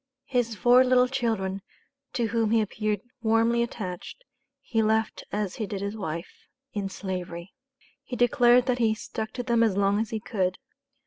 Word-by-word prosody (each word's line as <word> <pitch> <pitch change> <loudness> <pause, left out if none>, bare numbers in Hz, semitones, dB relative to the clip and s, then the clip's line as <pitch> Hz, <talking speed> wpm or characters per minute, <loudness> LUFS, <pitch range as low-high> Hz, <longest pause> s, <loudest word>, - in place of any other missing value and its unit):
His 245 -3 0
four 245 +4 +6
little 255 0 +4
children, 220 -7 -1 0.5
to 235 -3 0
whom 225 -1 +1
he 225 +1 +4
appeared 210 -1 -1 0.2
warmly 230 +1 +3
attached, 190 -7 -5 0.4
he 245 -5 -1
left 220 0 +1
as 205 -2 -2
he 215 - -2
did 195 -2 -4
his 200 +1 -3
wife 170 -5 -6 0.3
in 200 -3 -2
Slavery. 180 -2 -5 0.5
He 255 - -6
declared 245 0 +5
that 250 -1 0
he 220 -2 +3
"stuck 220 0 -5
to 245 - -3
them 235 -2 +2
as 215 -4 +3
long 200 +1 +3
as 220 0 -1
he 220 - -3
could." 185 -4 -1
220 Hz, 170 wpm, -27 LUFS, 200-240 Hz, 0.5 s, four